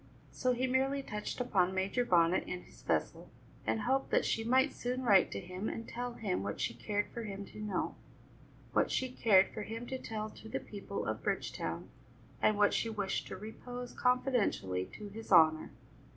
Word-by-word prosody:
So 255 -1 +1
he 250 +1 0
merely 270 +2 +1
touched 210 -1 -4
upon 190 -7 +2
Major 195 +6 +1
Bonnet 175 -4 +3
and 180 0 -4
his - - -17
vessel, - - -1 0.4
and 220 - +1
hoped 265 +4 +1
that - - +3
she 225 - 0
might 260 +5 +3
soon 250 +1 -2
write 200 -6 +6
to - - -4
him 185 +3 -4
and 230 - -5
tell 245 0 -4
him 205 - -2
what 100 +1 -4
she - - 0
cared 205 - -2
for 235 - -4
him 200 -2 -5
to - - -12
know, 210 -3 -1 0.8
what - - +3
she 260 - 0
cared 200 -6 +5
for - - -4
him 225 +3 -5
to 260 +1 -4
tell 215 -2 -4
to 220 - -12
the - - -2
people 200 -1 -5
of - - -2
Bridgetown, - - -2 0.5
and 215 - +4
what 205 0 +4
she 230 - +1
wished 200 -3 -2
to - - -6
repose 245 +4 -7
confidentially 245 - +1
to 210 -1 -7
his 220 +2 -9
honour. 160 -3 +6
215 Hz, 190 wpm, -33 LUFS, 195-245 Hz, 0.8 s, write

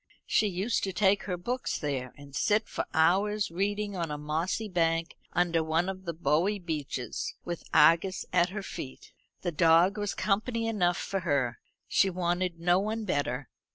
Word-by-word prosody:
She 215 - +2
used 200 +4 -1
to 190 - -3
take 195 +1 +3
her 180 -3 -2
books 245 +8 -2
there, 130 -4 -3
and 140 -1 -12
sit 215 +1 +2
for - - -3
hours 195 +5 +2
reading 205 +3 -1
on 170 -3 -2
a 150 - -3
mossy 160 +8 -2
bank 165 -2 0 0.2
under 170 -2 +2
one 160 +3 +1
of 190 0 -5
the 170 - -2
boughy 165 +6 +1
beeches, 150 -8 -4
with 175 -1 -4
Argus 165 +5 +4
at 180 0 +4
her 200 +2 -5
feet. 130 -8 -8 0.3
The 175 - 0
dog 170 +5 +4
was 205 -1 -2
company 225 +3 0
enough 180 -5 +1
for 195 - -2
her. 140 -9 0 0.3
She 195 - +3
wanted 175 -1 -1
no 175 +2 +3
one 215 +2 -2
better. 145 - -1
175 Hz, 170 wpm, -29 LUFS, 160-200 Hz, 0.3 s, Argus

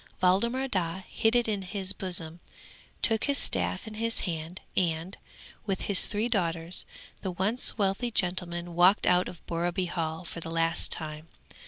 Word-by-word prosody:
Waldemar 235 +9 +2
Daa 185 -5 -1
hid 225 +2 +1
it 240 -1 +3
in 210 -3 0
his 195 +1 -2
bosom, 175 -3 -1 0.6
took 225 -1 +4
his 280 -1 +1
staff 90 - -1
in 220 - -7
his 230 +1 0
hand, 165 0 -4
and, 170 +1 0 0.5
with 195 -1 -1
his 200 -3 +3
three 210 +2 0
daughters, 170 -6 0 0.4
the 190 - -2
once 195 +9 +1
wealthy 200 +4 +1
gentleman 175 -4 -1
walked 180 +4 +5
out 180 0 +4
of 175 - -12
Borreby 175 +2 -1
Hall 165 0 -3
for 165 - -6
the 165 - -6
last 165 0 0
time. 155 0 -1
180 Hz, 160 wpm, -29 LUFS, 165-205 Hz, 0.6 s, walked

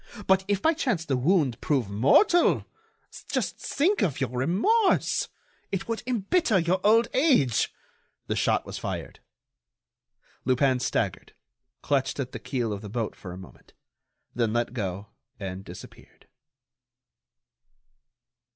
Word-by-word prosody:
But 190 0 +3
if 200 -1 0
by 320 - +4
chance 240 - -1
the 140 - 0
wound 135 -2 +1
prove 135 -7 0
mortal? 140 - +4 0.6
Just - - -2
think 365 +9 +1
of 160 -5 0
your 130 -3 -1
remorse! 195 - +2 0.4
It 195 -1 -3
would 230 -1 -2
embitter 245 - +1
your 180 +1 +1
old 225 +2 +5
age." 255 - +3 0.5
The - - -2
shot - - +1
was - - -6
fired. - - -5 1.2
Lupin 130 0 +2
staggered, - - -2 0.5
clutched 140 0 0
at 130 -2 -3
the - - -6
keel 120 -5 -2
of 100 - -6
the 105 - -8
boat 115 +1 -3
for 90 - -9
a 90 - -8
moment, 95 -1 -14 0.6
then 115 -2 0
let 120 0 -1
go 100 -3 -4 0.3
and 95 -1 -6
disappeared. 90 -2 -13
140 Hz, 130 wpm, -26 LUFS, -, 1.2 s, old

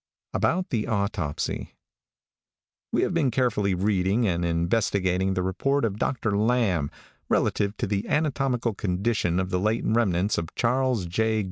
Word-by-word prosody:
ABOUT 165 - 0
THE 110 -3 0
AUTOPSY. 100 -8 -2 1.2
|WE - - +2
have 180 - 0
been 160 -6 +2
carefully 110 -6 +1
reading 100 +3 +1
and 85 -2 0
investigating 90 +2 +1
the 90 - 0
report 135 +9 0
of 105 -1 -3
Dr. 110 -6 0
Lamb, 105 -9 +1 0.4
relative 100 0 +1
to - - -1
the 100 0 -2
anatomical 135 -6 0
condition 95 -2 0
of 95 0 -2
the 90 - +1
late 110 +4 0
remnants 105 -4 +2
of 80 - -7
Charles 125 -4 +1
J. 110 +5 0
105 Hz, 140 wpm, -26 LUFS, 95-120 Hz, 1.2 s, |WE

